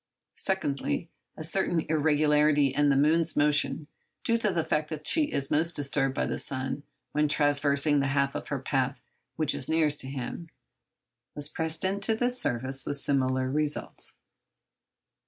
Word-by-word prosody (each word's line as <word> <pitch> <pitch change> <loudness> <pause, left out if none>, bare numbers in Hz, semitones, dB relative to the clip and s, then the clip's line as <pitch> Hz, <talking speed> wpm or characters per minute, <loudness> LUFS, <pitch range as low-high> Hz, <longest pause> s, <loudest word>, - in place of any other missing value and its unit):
Secondly, 165 -3 -1 0.3
a 155 - -6
certain 170 0 +1
irregularity 150 -2 +3
in 145 +1 +3
the 140 - +3
moon's 160 +3 +2
motion, 150 +1 +2 0.4
due 230 0 +2
to 210 -2 +1
the 170 -3 0
fact 155 -1 -1
that 155 -1 -6
she 310 - +2
is 135 -1 0
most 165 +3 +1
disturbed 140 -1 0
by - - 0
the - - -3
sun 130 +1 -2 0.3
when 150 0 +2
traversing 145 0 +3
that 140 - +1
half 140 0 +1
of - - -5
her 140 - -2
path 135 0 -1 0.4
which 155 -2 +1
is 130 - -2
nearest 155 -2 +3
to 130 - -6
him, 135 +5 -6 0.9
was 145 0 -1
pressed 160 +3 -3
into 200 +3 +1
the 245 +2 0
service 135 - -3
with 145 - -3
similar 130 -2 0
results. 150 +1 -2
150 Hz, 155 wpm, -28 LUFS, 140-160 Hz, 0.9 s, irregularity